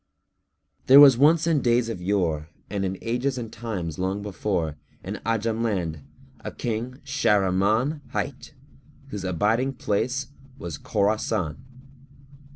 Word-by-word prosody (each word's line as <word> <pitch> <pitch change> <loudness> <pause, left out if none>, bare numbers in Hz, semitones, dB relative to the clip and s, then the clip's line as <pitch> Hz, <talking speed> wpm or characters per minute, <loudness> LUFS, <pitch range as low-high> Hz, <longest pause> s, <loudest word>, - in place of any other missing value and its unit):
There 135 +2 +9
was 140 -3 +9
once 155 +5 +4
in 160 -4 +2
days 120 -1 +2
of 115 -6 -5
yore 85 -5 0 0.2
and 100 -2 -1
in 95 0 -3
ages 125 +3 -1
and 115 -3 -6
times 95 -9 -5
long 95 +1 0
gone 100 - -6
before, 90 -6 -2 0.3
in - - -6
Ajam 115 0 0
land 90 -9 -1 0.4
a - - -6
King 120 +2 -3
Shahrimán[FN#302] 105 +3 +1
hight, 140 -2 -5 0.5
whose 105 -6 -5
abiding 105 +9 +1
place 130 +3 -1 0.3
was 85 - -6
Khorásán. 105 -5 0
110 Hz, 130 wpm, -25 LUFS, 95-125 Hz, 0.5 s, There